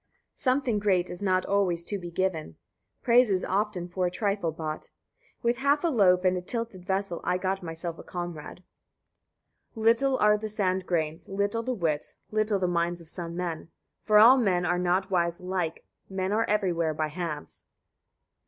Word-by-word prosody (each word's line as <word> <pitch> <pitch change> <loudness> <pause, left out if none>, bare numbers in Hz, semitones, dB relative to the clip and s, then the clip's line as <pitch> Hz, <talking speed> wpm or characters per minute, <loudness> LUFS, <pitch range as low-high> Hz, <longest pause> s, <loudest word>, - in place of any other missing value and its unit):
Something 255 -4 +1
great 185 -3 +1
is 175 - -7
not 185 -2 +1
[always] 185 -4 +1
to 200 +3 -4
be 175 -1 -7
given, 170 -2 -2 0.5
praise 245 -1 +5
is 190 -2 +1
often 195 -2 -1
for 180 0 -1
a - - 0
trifle 200 -2 -1
bought. 155 -1 -5 0.5
With 235 +1 +2
half 280 +3 +2
a 340 - +3
loaf 185 - +4
and 185 0 +4
a 180 - -2
tilted 230 -2 -5
vessel 190 -2 -2
I 180 - +1
got 190 +1 -2
myself 165 0 -5
a - - -9
comrade. 175 -1 -7 1.1
53. 220 - -5
Little 260 +4 +4
are 210 0 +4
the 215 0 -4
sand 190 -3 -1
grains, 160 -2 -2
little 200 +3 -1
the 255 +2 -2
wits, 160 -7 -2 0.2
little 215 -1 +1
the 185 -1 0
minds 175 0 0
of 165 -1 -10
[some] 170 -2 -5
men; 170 -2 -4 0.3
for 210 -1 +4
all 235 +5 +9
men 180 -6 +2
are 175 +1 +1
not 185 +2 0
wise 170 -2 +1
alike: 180 -3 -3 0.2
men 190 0 -2
are 220 +2 +2
everywhere 175 -6 0
by 155 0 -1
halves. 160 -2 -6
54. - - -49
185 Hz, 180 wpm, -27 LUFS, 175-210 Hz, 1.1 s, all